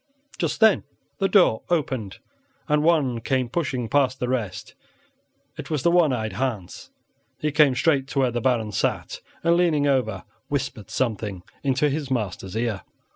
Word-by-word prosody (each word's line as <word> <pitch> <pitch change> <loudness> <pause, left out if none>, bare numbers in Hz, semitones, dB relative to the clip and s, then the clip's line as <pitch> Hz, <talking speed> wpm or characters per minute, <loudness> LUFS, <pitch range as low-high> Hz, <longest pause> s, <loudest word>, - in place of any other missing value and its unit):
Just 160 -5 -1
then 220 -2 +5 0.4
the 195 - +2
door 180 - +4
opened 130 - -1 0.5
and 150 -1 +2
one 150 -7 +2
came 130 +1 0
pushing 130 -5 -2
past 135 0 +1
the 125 - -1
rest; 115 -7 -3 0.8
it 150 -3 -7
was 150 -5 -1
the 170 - +4
one 170 -4 +4
eyed 110 -4 -2
Hans. 115 -9 -4 0.5
He 150 - -1
came 145 -3 +4
straight 135 -1 +2
to 140 - -2
where 130 -2 +2
the 120 0 -2
Baron 115 -4 +1
sat, - - -2 0.2
and, 170 +1 +4
leaning 165 -5 +2
over, 125 -8 0 0.2
whispered 135 -7 -3
something 105 -7 -2 0.2
into 135 +1 +2
his 145 -1 -2
master's 105 -6 -3
ear. 110 -4 -1
130 Hz, 160 wpm, -24 LUFS, 115-150 Hz, 0.8 s, then